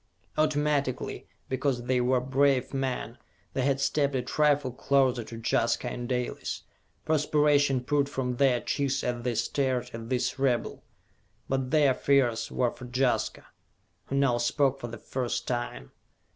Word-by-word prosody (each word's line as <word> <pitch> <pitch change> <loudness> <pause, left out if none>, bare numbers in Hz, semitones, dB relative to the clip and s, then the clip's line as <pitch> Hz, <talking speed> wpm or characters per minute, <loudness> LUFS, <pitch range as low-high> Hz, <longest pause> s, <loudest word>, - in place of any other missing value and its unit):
Automatically, 150 -3 0 0.2
because 130 -2 -1
they 125 0 +1
were 125 +1 +3
brave 135 +1 +1
men, 130 -3 -3 0.3
they 135 - 0
had 135 +1 +1
stepped 140 0 +1
a 125 - 0
trifle 145 -3 +2
closer 130 -1 +2
to 115 +1 -9
Jaska 115 +1 +1
and 120 0 -5
Dalis. 125 -1 -3 0.4
Perspiration 145 -3 +3
poured 140 +1 +1
from 125 -3 -2
their 130 -3 +3
cheeks 135 -1 -1
as 120 -1 -2
they 120 -1 -1
stared 125 -1 -1
at 115 0 -7
this 130 +1 -1
rebel. 130 -3 0 0.7
But 135 -1 -1
their 145 -3 +4
fears 130 -4 +2
were 125 -2 +1
for 125 +1 -10
Jaska, 125 0 0 0.6
who 135 - -3
now 135 -4 +3
spoke 135 +3 +1
for 120 - -5
the 115 0 -7
first 125 -2 -3
time. 120 - -3
130 Hz, 145 wpm, -28 LUFS, 125-140 Hz, 0.7 s, their